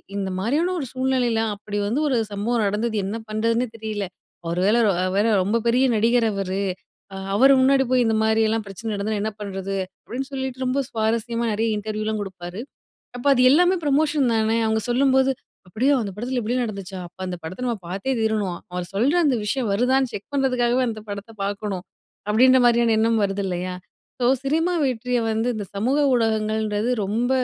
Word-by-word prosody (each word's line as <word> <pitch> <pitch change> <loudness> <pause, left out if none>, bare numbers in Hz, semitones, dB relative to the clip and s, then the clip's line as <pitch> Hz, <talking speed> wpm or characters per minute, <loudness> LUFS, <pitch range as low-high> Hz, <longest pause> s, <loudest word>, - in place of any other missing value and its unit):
இந்த 195 -1 -2
மாரியான 305 - +1
ஒரு 275 - -3
சூழ்நிலையில 255 -3 +1
அப்படி 205 0 -6
வந்து 235 +8 0
ஒரு 260 -4 +1
சம்பவம் 225 +4 -1
நடந்தது, 215 +3 -1
என்ன 205 +3 -3
பண்றதுன்னே 230 +3 0
தெரியல, 215 -3 -4 0.4
ஒரு 170 +1 -1
வேள 210 - +4 0.4
வேற 205 - +3 0.2
ரொம்ப 210 +5 +1
பெரிய 250 +3 +4
நடிகர் 230 +1 +3
அவரு. 195 -1 -2 0.5
அ - - -7 0.2
அவரு 270 +5 +6
முன்னாடி 270 +1 +4
போய் 250 -1 +4
இந்தமாரியெல்லாம் 220 0 +2
பிரச்சன 220 +3 -6
நடந்ததுனா 205 +1 -2
என்ன 220 - -1
பண்றது? 195 -1 -4 0.3
அப்டின்னு 265 +3 -5
சொல்லிட்டு 265 -1 -3
ரொம்ப 270 +2 0
சுவாரஸ்யமா 230 +1 -1
நிறைய 220 +1 0
இன்டர்வியூலாம் 215 0 -3
குடுப்பாரு. 185 +1 -7 0.6
அப்போ, 245 - -7
அது 250 - +3
எல்லாமே 355 +4 +4
ப்ரமோஷன் 290 -2 +2
தானே? 220 +1 +2
அவுங்க 220 0 +1
சொல்லும்போது, 265 +1 +3 0.4
அப்படியா? 255 +9 +1
அந்த 200 -2 -5
படத்தில 245 +2 -2
இப்படி 235 +4 -1
நடந்துச்சா? 195 -4 -6
அப்போ 185 +2 -23
அந்த 180 - -4
படத்தை 185 +10 -6
நம்ம 235 -3 -1
பாத்தே 200 +9 -2
தீரணும், 210 -5 0
அவர் 180 0 -3
சொல்ற 250 - +2
அந்த 265 - +3
விஷயம் 240 -2 -1
வருதான்னு 255 +4 +2
செக் 205 - -7
பண்றதுக்காகவே, 255 -2 +2
அந்த 215 - -6
படத்த 200 +2 -6
பாக்கணும். 200 -2 -3 0.4
அப்படின்ற 255 +5 +5
மாரியான 235 -1 +4
எண்ணம் 225 0 +2
வருது 195 0 -2
இல்லையா? 180 0 -3 0.5
ஸோ, - - +1 0.2
சினிமா 325 +5 +1
வெற்றிய 250 -1 0
வந்து, 225 +2 0
இந்த 210 - -4
சமூக 245 +8 +1 0.2
ஊடகங்கள்ன்றது 220 -1 0
ரொம்ப 230 +6 -1
225 Hz, 165 wpm, -23 LUFS, 205-255 Hz, 0.6 s, அவரு